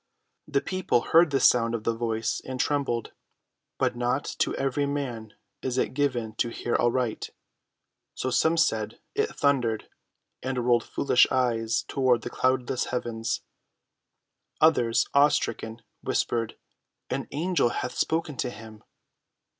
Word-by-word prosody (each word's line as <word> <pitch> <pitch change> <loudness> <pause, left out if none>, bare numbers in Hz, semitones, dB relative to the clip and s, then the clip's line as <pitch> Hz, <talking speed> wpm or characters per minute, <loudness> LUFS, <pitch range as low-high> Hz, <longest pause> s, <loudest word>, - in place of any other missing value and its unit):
The 140 -2 +1
people 185 -10 0
heard 165 +5 +5
the 140 -1 +1
sound 115 -2 +4
of 110 - -5
the 115 - +1
Voice 115 -1 -2
and 130 -1 -6
trembled. 135 -6 0 0.7
But - - +1
not 125 +3 0
to - - +1
every 135 +1 0
man 125 -7 -4 0.3
is 130 -1 -2
it - - 0
given 125 -6 -1
to 120 - +1
hear 120 - -4
aright; 120 -1 0 0.9
so 130 - -2
some 160 +6 +3
said, 110 -9 +1
"It 430 +2 +1
thundered," 125 -7 +1 0.5
and 130 -2 -2
rolled 120 -1 +3
foolish 130 -3 +3
eyes 115 -3 +1
toward 125 -4 +2
the 120 - -5
cloudless 130 0 0
heavens. 115 -2 -2 1.2
Others, 125 -8 +4
awe‐stricken, 120 -5 +2 0.2
whispered, 115 -2 -1 0.6
"An 135 +1 -2
angel 165 -2 +1
hath 125 - -3
spoken 160 -2 -1
to 125 - -1
him." 110 -2 -11
125 Hz, 130 wpm, -27 LUFS, 115-140 Hz, 1.2 s, heard